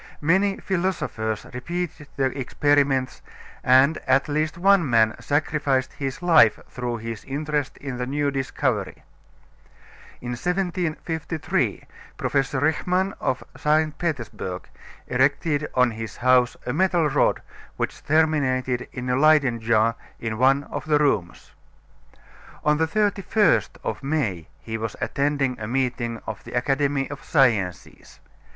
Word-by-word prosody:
Many 195 Hz, +6 st, +2 dB
philosophers 170 Hz, -, -2 dB
repeated 160 Hz, +3 st, -4 dB
the 135 Hz, -1 st, 0 dB
experiments 140 Hz, -1 st, +1 dB, 0.4 s
and 130 Hz, +5 st, +5 dB
at 130 Hz, +3 st, +3 dB
least 155 Hz, +2 st, -1 dB
one 190 Hz, -4 st, +4 dB
man 110 Hz, -2 st, +3 dB
sacrificed 145 Hz, -3 st, 0 dB
his 135 Hz, +4 st, -5 dB
life 160 Hz, -11 st, +6 dB
through 120 Hz, -1 st, -4 dB
his 115 Hz, -1 st, -6 dB
interest 145 Hz, 0 st, -2 dB
in 135 Hz, -3 st, -6 dB
the 125 Hz, -, -2 dB
new 145 Hz, +1 st, 0 dB
discovery. 135 Hz, -1 st, -2 dB, 1.2 s
In 120 Hz, -, -7 dB
1753 165 Hz, +1 st, -2 dB, 0.3 s
Professor 135 Hz, -1 st, 0 dB
Richman 180 Hz, +6 st, +1 dB
of 130 Hz, -, -1 dB
St. 155 Hz, 0 st, +1 dB
Petersburg 120 Hz, -, -4 dB, 0.4 s
erected 145 Hz, +4 st, +1 dB
on 125 Hz, -1 st, +4 dB
his 110 Hz, 0 st, -7 dB
house 125 Hz, 0 st, +3 dB
a 125 Hz, -, -2 dB
metal 175 Hz, -1 st, +2 dB
rod 140 Hz, -, +1 dB, 0.3 s
which -, -, -3 dB
terminated 135 Hz, -5 st, +1 dB
in 125 Hz, 0 st, -6 dB
a 125 Hz, -, +1 dB
Leyden 140 Hz, -4 st, +4 dB
jar 115 Hz, 0 st, +2 dB, 0.3 s
in 110 Hz, -1 st, -4 dB
one 135 Hz, +2 st, +4 dB
of -, -, -4 dB
the 150 Hz, -1 st, +4 dB
rooms. 105 Hz, -13 st, -1 dB, 1.1 s
On 150 Hz, 0 st, +3 dB
the 160 Hz, +1 st, +1 dB
31st 205 Hz, +1 st, +1 dB
of -, -, -3 dB
May 135 Hz, -, -2 dB
he 110 Hz, +6 st, -5 dB
was 110 Hz, -1 st, -4 dB
attending 140 Hz, -3 st, 0 dB
a 105 Hz, -, -4 dB
meeting 120 Hz, -2 st, -1 dB
of 110 Hz, -2 st, -6 dB
the -, -, -10 dB
Academy 135 Hz, +2 st, 0 dB
of 140 Hz, -, -8 dB
Sciences. 110 Hz, -, 0 dB
140 Hz, 125 wpm, -24 LUFS, 125-155 Hz, 1.2 s, life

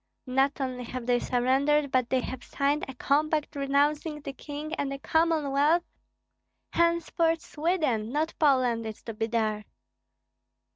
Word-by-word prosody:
"Not 270 Hz, +2 st, +1 dB
only 255 Hz, -2 st, -3 dB
have 250 Hz, 0 st, -6 dB
they 245 Hz, 0 st, +2 dB
surrendered, 270 Hz, +4 st, +2 dB
but 255 Hz, -2 st, +1 dB
they 260 Hz, -1 st, +2 dB
have 255 Hz, 0 st, -6 dB
signed 285 Hz, +2 st, 0 dB
a 265 Hz, -, -8 dB
compact 300 Hz, +3 st, 0 dB
renouncing 290 Hz, +2 st, +1 dB
the 280 Hz, -1 st, -7 dB
King 295 Hz, +3 st, -7 dB
and 285 Hz, -4 st, -2 dB
the 275 Hz, -, -3 dB
Commonwealth. 315 Hz, +1 st, +2 dB, 0.9 s
Henceforth 335 Hz, -1 st, +2 dB
Sweden, 300 Hz, -9 st, -1 dB
not 310 Hz, +3 st, 0 dB
Poland, 255 Hz, -6 st, +3 dB
is 220 Hz, -, -8 dB
to 225 Hz, -, -6 dB
be 225 Hz, +1 st, -2 dB
there." 215 Hz, -2 st, -1 dB
280 Hz, 140 wpm, -28 LUFS, 250-305 Hz, 0.9 s, Poland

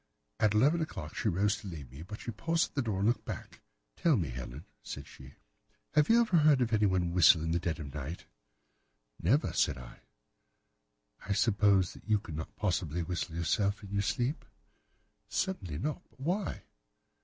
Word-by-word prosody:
At 105 Hz, -1 st, +3 dB
eleven 145 Hz, +10 st, +4 dB
o'clock 80 Hz, -, -5 dB
she 110 Hz, -, 0 dB
rose 100 Hz, +4 st, +1 dB
to 105 Hz, -, -9 dB
leave 75 Hz, -8 st, -8 dB
me, 70 Hz, +4 st, -10 dB
but 105 Hz, +6 st, -8 dB
she 120 Hz, -, -4 dB
paused 165 Hz, +9 st, 0 dB
at -, -, -39 dB
the 140 Hz, -, +2 dB
door 110 Hz, -6 st, -2 dB
and 100 Hz, -, +3 dB
looked 115 Hz, -2 st, +1 dB
back. -, -, -7 dB, 0.4 s
"'Tell 160 Hz, -6 st, +3 dB
me, 85 Hz, -8 st, -1 dB
Helen,' 60 Hz, +4 st, -7 dB, 0.2 s
said -, -, -7 dB
she, 65 Hz, 0 st, -14 dB, 0.6 s
'have 150 Hz, -1 st, +4 dB
you 230 Hz, +1 st, +7 dB
ever 220 Hz, -7 st, +3 dB
heard 150 Hz, -3 st, +5 dB
anyone 95 Hz, -5 st, +2 dB
whistle 85 Hz, -2 st, +6 dB
in 80 Hz, -, -1 dB
the 85 Hz, -, +2 dB
dead 85 Hz, -1 st, -2 dB
of 70 Hz, -3 st, -6 dB
the 75 Hz, -, -5 dB
night?' 75 Hz, +6 st, -6 dB, 1.0 s
"'Never,' 125 Hz, -, +2 dB
said 70 Hz, -, +2 dB
I. 60 Hz, -1 st, -11 dB, 1.3 s
"'I 100 Hz, -, +1 dB
suppose 100 Hz, -3 st, +3 dB
that -, -, -15 dB
you 105 Hz, -, +5 dB
could 85 Hz, -6 st, -7 dB
not 80 Hz, -, -6 dB
possibly 85 Hz, -4 st, -1 dB
whistle, 85 Hz, -1 st, -3 dB
yourself, 100 Hz, +5 st, 0 dB
in 100 Hz, -, -9 dB
your 100 Hz, 0 st, +1 dB
sleep?' 120 Hz, -, -1 dB, 0.9 s
"'Certainly 95 Hz, -, -2 dB
not. 150 Hz, -, -2 dB
But -, -, -29 dB
why? 175 Hz, +7 st, -2 dB
100 Hz, 185 wpm, -31 LUFS, 80-120 Hz, 1.3 s, you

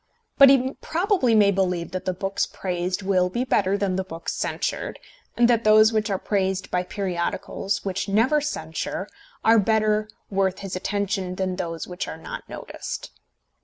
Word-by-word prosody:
But 275 Hz, -1 st, +10 dB
he 265 Hz, 0 st, +4 dB
probably 345 Hz, -, +2 dB
may 205 Hz, -2 st, +6 dB
believe 180 Hz, -3 st, -1 dB
that 185 Hz, -, -4 dB
the 185 Hz, -, 0 dB
books 195 Hz, +2 st, -1 dB
praised 180 Hz, +1 st, -3 dB
will 185 Hz, -2 st, +2 dB
be 240 Hz, +7 st, -1 dB
better 200 Hz, -6 st, +2 dB
than 190 Hz, -2 st, 0 dB
the 190 Hz, -, 0 dB
books 165 Hz, -3 st, -5 dB
censured, -, -, -3 dB, 0.4 s
and 240 Hz, 0 st, +5 dB
that 235 Hz, -2 st, +3 dB
those 215 Hz, +1 st, +6 dB
which 215 Hz, 0 st, +1 dB
are 195 Hz, -, 0 dB
praised 190 Hz, -1 st, -1 dB
by 180 Hz, -, +1 dB
periodicals 190 Hz, +2 st, -3 dB
which 195 Hz, +1 st, -2 dB
never 240 Hz, +9 st, +3 dB
censure 185 Hz, -, -4 dB, 0.4 s
are 225 Hz, 0 st, +6 dB
better 215 Hz, 0 st, +2 dB, 0.2 s
worth 190 Hz, -1 st, 0 dB
his 195 Hz, -2 st, -5 dB
attention 195 Hz, -1 st, -2 dB
than 185 Hz, -1 st, -1 dB
those 165 Hz, -2 st, -4 dB
which 180 Hz, 0 st, -5 dB
are -, -, -6 dB
not 160 Hz, -, -8 dB
noticed. -, -, -7 dB
195 Hz, 165 wpm, -24 LUFS, 185-215 Hz, 0.4 s, But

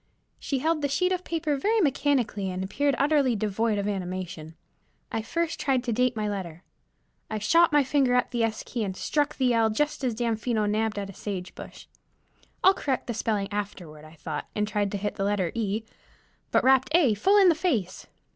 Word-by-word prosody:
She 275 Hz, -, -2 dB
held 310 Hz, +3 st, 0 dB
the 285 Hz, -, +1 dB
sheet 360 Hz, +6 st, +1 dB
of 365 Hz, -1 st, -1 dB
paper 320 Hz, -4 st, -1 dB
very 430 Hz, +11 st, +1 dB
mechanically, 270 Hz, -, +1 dB
and 185 Hz, 0 st, -3 dB
appeared 280 Hz, +8 st, 0 dB
utterly 280 Hz, -4 st, +2 dB
devoid 215 Hz, +1 st, 0 dB
of 200 Hz, 0 st, -1 dB
animation. 180 Hz, -5 st, -5 dB, 0.6 s
I 225 Hz, -, -1 dB
first 335 Hz, +8 st, -2 dB
tried 265 Hz, -3 st, +1 dB
to 240 Hz, -2 st, -1 dB
date 250 Hz, +1 st, +1 dB
my 215 Hz, -1 st, -2 dB
letter. 185 Hz, -4 st, -5 dB, 0.7 s
I 220 Hz, -, -2 dB
shot 330 Hz, +12 st, +4 dB
my 295 Hz, -1 st, +4 dB
finger 265 Hz, -2 st, +2 dB
at 250 Hz, -, +1 dB
the 240 Hz, -2 st, -1 dB
S 225 Hz, -1 st, -1 dB
key 235 Hz, -3 st, -3 dB
and 190 Hz, -2 st, -4 dB
struck 295 Hz, -1 st, 0 dB
the 255 Hz, -2 st, +2 dB
L 225 Hz, -1 st, +3 dB
just 295 Hz, +6 st, -1 dB
as 245 Hz, -3 st, 0 dB
Damfino 225 Hz, -1 st, 0 dB
nabbed 215 Hz, +1 st, 0 dB
at 200 Hz, -1 st, -4 dB
a -, -, -15 dB
sage 185 Hz, -2 st, -6 dB
bush. -, -, -11 dB, 0.8 s
I'll 380 Hz, -, +7 dB
correct 275 Hz, -8 st, -2 dB
the 240 Hz, -, -3 dB
spelling 210 Hz, -3 st, -1 dB
afterward 180 Hz, -7 st, -5 dB
I 155 Hz, +1 st, -14 dB
thought, 150 Hz, -1 st, -5 dB
and 210 Hz, 0 st, 0 dB
tried 205 Hz, -1 st, -1 dB
to -, -, 0 dB
hit 205 Hz, +1 st, -4 dB
the 195 Hz, -, -1 dB
letter 195 Hz, -4 st, 0 dB
E, 220 Hz, -1 st, -2 dB, 0.7 s
but -, -, +2 dB
rapped 260 Hz, 0 st, +4 dB
A 290 Hz, -10 st, +5 dB
full 385 Hz, -, +3 dB
in 390 Hz, -3 st, +7 dB
the -, -, +5 dB
face. 270 Hz, -, -2 dB
225 Hz, 205 wpm, -26 LUFS, 200-280 Hz, 0.8 s, I'll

